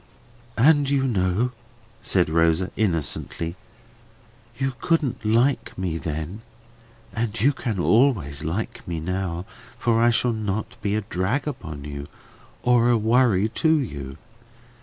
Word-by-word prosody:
"And 145 +3 +5
you 140 -1 +2
know," 105 0 +1 0.5
said 90 -3 +2
Rosa 80 +3 +2
innocently, 85 - -1 1.0
"you 135 0 -1
couldn't 160 -9 0
like 115 +6 +1
me 90 -3 -2
then; 80 +7 -4 0.7
and 115 0 -2
you 140 +7 +4
can 115 -7 -3
always 95 - +2
like 110 +9 -4
me 85 -2 -3
now, 90 +1 -3 0.3
for 115 -1 +2
I 120 - +5
shall 120 0 +2
not 110 -1 -3
be 105 -1 0
a 110 - 0
drag 100 +9 -1
upon 80 - -6
you, 70 -1 -6 0.6
or 120 -1 +4
a 120 - +4
worry 110 -2 +3
to 160 +8 +2
you. 70 - -5
110 Hz, 130 wpm, -24 LUFS, 85-120 Hz, 1.0 s, And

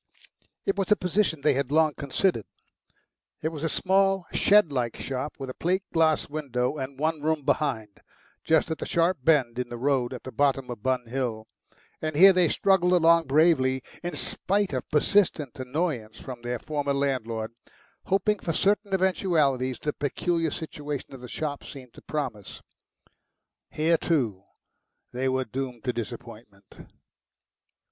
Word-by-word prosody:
It 195 - 0
was 195 - -1
a - - +8
position 180 -4 0
they 145 0 +3
had 135 -1 -1
long 155 0 +4
considered. 140 - 0 1.0
It 160 - +1
was 155 -2 -7
a 165 - +1
small, 195 0 +2
shed 205 -6 +4
like 120 -4 -2
shop 135 +2 -4
with 135 - -6
a 130 - -5
plate 185 +6 0
glass 160 -2 +3
window 140 -2 -2
and 130 0 -5
one 155 0 0
room 155 -2 0
behind, 130 -8 -1 0.4
just 160 +1 +2
at 160 - -3
the - - -4
sharp 170 -1 +1
bend 130 -6 +3
in 125 -1 -3
the 120 - -6
road 130 -1 +1
at 125 - -7
the 130 - -7
bottom 135 0 +1
of 115 -4 -7
Bun 130 0 0
Hill; 115 -3 -3 0.6
and 155 -1 -3
here 190 +5 +8
they 180 -2 +4
struggled 180 +1 +3
along 165 -2 +5
bravely, 135 -3 +3 0.2
in 175 -2 -4
spite 200 +4 -1
of 130 - -3
persistent 155 - +2
annoyance 130 -5 -3
from 125 -2 -8
their 120 +1 -3
former 145 +1 -2
landlord, 115 -5 -1 0.5
hoping 195 +2 +1
for 165 - -2
certain 200 +2 +1
eventualities 155 - +1
the 150 - -3
peculiar 165 +3 -1
situation 145 -3 -6
of 130 - -10
the 125 - -8
shop 145 +1 -4
seemed 130 -4 -11
to - - -14
promise. 130 -10 -5 1.1
Here, 165 +2 +2
too, 115 - 0 0.7
they 130 +2 0
were 130 0 0
doomed 125 -1 -5
to 125 - -1
disappointment. 115 -3 -9
145 Hz, 155 wpm, -26 LUFS, 125-165 Hz, 1.1 s, a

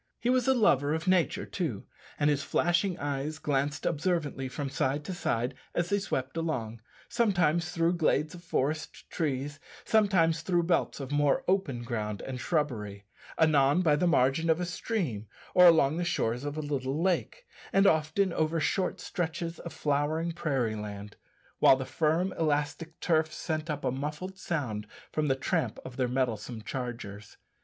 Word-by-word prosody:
He 245 - +1
was 255 -1 +2
a 265 - +5
lover 145 - +3
of 160 +3 -4
nature, 185 +2 +2
too, 145 - -3 0.3
and 145 - +3
his 145 -2 +2
flashing 175 +4 +1
eyes 145 +1 -3
glanced 145 -1 -1
observantly 155 -5 -1
from 140 +2 -4
side 140 +2 -1
to 185 - -4
side 125 -7 -1 0.2
as 175 0 0
they 200 - +3
swept 130 -8 -3
along 120 -9 -3 0.3
sometimes 175 -8 +2
through 170 +1 +1
glades 155 0 +1
of 175 -1 -11
forest 155 -1 -2
trees, 145 -2 -2 0.3
sometimes 185 -7 +3
through 175 -2 +1
belts 170 -2 0
of 135 -1 -6
more 145 -1 +2
open 170 -11 0
ground 105 -4 -3
and 130 -1 -5
shrubbery; 110 - -2 0.3
anon 155 +1 +4
by 155 -4 +4
the 175 +4 +1
margin 160 0 +3
of 160 +1 +3
a 180 - -1
stream 170 - -3 0.3
or 180 0 +8
along 160 -3 +5
the 175 - 0
shores 125 -6 -1
of 145 +1 -4
a - - -1
little 140 -1 -2
lake, 190 - -1 0.3
and 195 +1 +4
often 160 +3 +2
over 160 +1 +1
short 185 +4 0
stretches 165 0 -3
of 170 - -7
flowering 150 +3 0
prairie 135 -9 -1
land 105 0 -7 0.4
while - - +7
the 130 0 -4
firm, 165 +6 +1
elastic 155 +1 -1
turf 160 -2 +2
sent 155 0 -3
up 150 -1 -3
a - - +2
muffled 150 +8 -4
sound 120 -13 -3 0.2
from 155 -1 0
the 135 - +2
tramp 125 -4 -1
of 130 - -8
their 130 -1 0
mettlesome 120 -3 -2
chargers. 110 -5 -6
150 Hz, 165 wpm, -29 LUFS, 130-170 Hz, 0.4 s, or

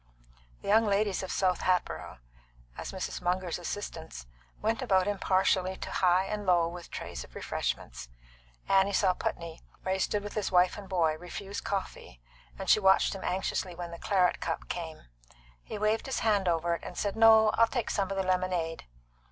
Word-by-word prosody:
The - - -8
young 220 +2 +4
ladies 200 -1 +1
of 190 - -5
South 185 -2 +1
Hatboro', 180 - -1 0.6
as - - -6
Mrs. - - -4
Munger's 180 -1 -1
assistants, 165 - -6 0.3
went 225 +4 0
about 190 -7 +3
impartially 190 -1 +1
to - - -6
high 185 +1 +3
and 210 +1 -3
low 175 -3 +3
with 175 0 -8
trays - - -6
of - - -17
refreshments. 60 0 -4 0.6
Annie 195 +1 +3
saw 190 -1 +3
Putney, 170 -2 -4 0.2
where 190 - 0
he 190 - -1
stood 205 +1 0
with 205 - -6
his 210 -3 -2
wife 180 0 +4
and 200 -2 -9
boy, 165 -4 +1
refuse 195 +3 -6
coffee, 195 - -5 0.4
and - - -6
she - - +6
watched 190 -1 +4
him 195 - -7
anxiously 185 -1 -2
when 175 0 -6
the 170 - -8
claret 185 -3 +2
cup 165 - -3
came. 165 -3 -5 0.6
He - - -7
waved 215 +3 0
his 265 - -2
hand 205 -4 +2
over 170 0 +1
it, 170 - -4
and 180 - -8
said, 205 -1 -1
"No; 220 -1 +7
I'll 230 +1 +4
take 240 -1 -2
some 195 -2 0
of 195 - -3
the 190 - +1
lemonade." 185 -3 -1
190 Hz, 185 wpm, -30 LUFS, 175-205 Hz, 0.6 s, No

